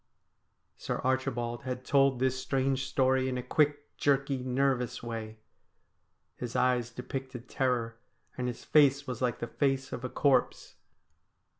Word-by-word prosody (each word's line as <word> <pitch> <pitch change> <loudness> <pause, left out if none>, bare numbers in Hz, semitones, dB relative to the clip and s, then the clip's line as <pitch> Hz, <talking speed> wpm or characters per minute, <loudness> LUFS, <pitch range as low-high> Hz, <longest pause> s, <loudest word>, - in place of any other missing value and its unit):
Sir - - -3
Archibald 125 -2 -1
had 130 0 -5
told 135 -2 +4
this 130 +1 +1
strange 130 0 0
story 130 0 +2
in 130 - -2
a 125 - -3
quick, 145 +2 0
jerky, 140 -1 +1
nervous 125 -1 0
way. 110 -2 -5 1.0
His 120 -2 -6
eyes 125 -2 +2
depicted 125 0 -6
terror, 120 -3 -1 0.4
and 125 -1 -2
his 120 - -5
face 140 -2 +4
was 125 -2 -5
like 125 -2 0
the - - -3
face 135 +1 -1
of 120 - -5
a 125 - -3
corpse. 135 -2 +1
130 Hz, 140 wpm, -30 LUFS, 125-135 Hz, 1.0 s, told